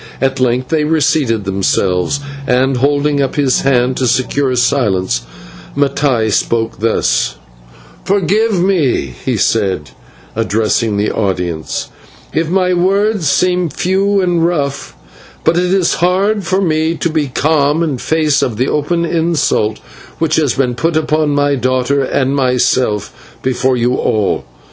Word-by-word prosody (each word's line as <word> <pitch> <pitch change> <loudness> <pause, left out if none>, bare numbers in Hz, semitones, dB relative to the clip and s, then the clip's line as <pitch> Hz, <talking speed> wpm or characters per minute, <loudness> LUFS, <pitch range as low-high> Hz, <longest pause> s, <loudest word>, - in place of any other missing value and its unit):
At 135 0 0
length 125 0 0
they 160 -2 +1
reseated 150 -7 +1
themselves, 95 +4 0 0.3
and, 130 +1 +2
holding 145 +2 +1
up 135 -1 -1
his 140 -3 +2
hand 130 -1 +1
to 130 - 0
secure 130 +2 0
silence, 95 - +1 0.6
Mattai 135 -5 +1
spoke 115 +2 -1
thus: 115 +1 0 0.7
"Forgive 200 +2 +1
me," 155 - +1
he - - -1
said, 95 - 0 0.4
addressing 110 0 0
the 105 +1 0
audience, 90 -6 -2 0.4
"if 160 0 0
my 185 0 +1
words 195 -1 +1
seem 180 0 +1
few 195 +4 0
and 175 -2 +1
rough, 145 -5 -2 0.5
but 160 - +2
it 180 +1 +1
is 190 -3 +2
hard 195 +4 +1
for 185 +3 0
me 160 -2 0
to 170 - -1
be 155 -2 0
calm 145 +3 +1
in 145 -6 -2
face 155 -1 +1
of 115 -4 -1
the 130 +3 0
open 170 +3 0
insult 160 -10 0 0.4
which 160 -1 0
has 150 -5 +1
been 130 -2 0
put 160 +6 0
upon 155 -1 +1
my 145 0 +1
daughter 130 +1 0
and 135 +1 0
myself 125 -5 -1
before 130 0 +1
you 120 +1 +1
all. 105 -5 0
140 Hz, 140 wpm, -14 LUFS, 120-165 Hz, 0.7 s, and